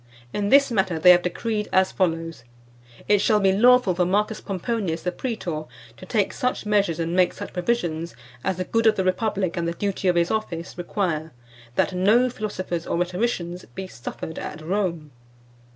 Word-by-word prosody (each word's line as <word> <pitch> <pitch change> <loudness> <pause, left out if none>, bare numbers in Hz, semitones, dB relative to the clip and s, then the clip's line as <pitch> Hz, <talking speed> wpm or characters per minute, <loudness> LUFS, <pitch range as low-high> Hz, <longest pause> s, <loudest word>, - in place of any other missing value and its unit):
In 205 -1 -1
this 275 +1 +5
matter, 190 -6 +1
they 180 +3 +7
have 175 0 +6
decreed 210 +4 -2
as 190 0 +3
follows: 165 -6 -1 0.6
'It 205 -1 +4
shall 215 -1 +3
be 195 -1 +4
lawful 245 -1 +5
for 180 - -2
M. 195 +4 +3
Pomponius, 200 -4 -3
the 180 - -1
praetor, 175 -8 -4 0.3
to 185 - -12
take 210 -2 +1
such 250 -3 -2
measures, 200 -6 +1
and 165 +1 -1
make 185 -1 +3
such - - -8
provisions, 175 -5 -1 0.3
as 190 -2 -1
the 185 - -1
good 230 +5 +1
of 220 - +5
the 190 - 0
Republic, 185 -1 0
and 170 -1 -1
the 170 - -1
duty 195 +1 -2
of 180 - +3
his 170 0 +2
office, 175 -6 -3
require, 170 -3 -2 0.4
that - - +1
no 215 +7 +3
Philosophers 185 -7 -4
or - - -1
Rhetoricians 180 -1 -2
be 190 - -4
suffered 160 0 -7
at 150 - -6
Rome. 170 -4 -2
185 Hz, 180 wpm, -24 LUFS, 170-210 Hz, 0.6 s, they